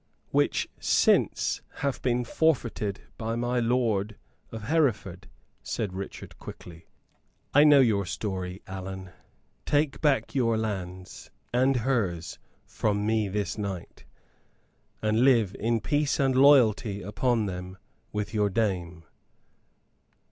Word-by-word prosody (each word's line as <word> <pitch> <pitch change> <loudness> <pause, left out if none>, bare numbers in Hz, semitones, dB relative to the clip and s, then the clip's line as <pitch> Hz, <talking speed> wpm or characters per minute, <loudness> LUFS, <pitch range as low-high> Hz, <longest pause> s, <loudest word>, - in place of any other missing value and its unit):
"Which - - +1
since - - +2
hath 140 -3 -2
been 125 -1 +1
forfeited 120 -8 0 0.2
by 115 0 -2
my 120 +1 0
lord 115 -4 0 0.4
of 110 -1 -7
Hereford," 105 - 0 0.3
said 105 -5 -3
Richard, 95 +1 -8
quickly. 85 -1 -11 0.7
"I 145 +2 +7
know 145 -2 +7
your 100 -6 +2
story, 95 0 -4
Allan. 95 -1 -7 0.5
Take 145 -1 0
back 145 -3 +1
your 115 -4 +2
lands 95 -4 -5 0.2
and 130 +2 +3
hers 110 -10 -1 0.3
from 105 -1 -1
me 110 -1 +1
this 100 +1 -3
night, 100 -4 -6 1.0
and 110 +2 +2
live 115 -8 +4
in 115 +1 +1
peace 145 +4 0
and 135 -2 +2
loyalty 125 -6 +4
upon 110 +3 0
them 90 -1 -6 0.3
with 105 +1 -3
your 105 -2 +2
dame. 90 -5 -2
110 Hz, 115 wpm, -27 LUFS, 95-125 Hz, 1.0 s, I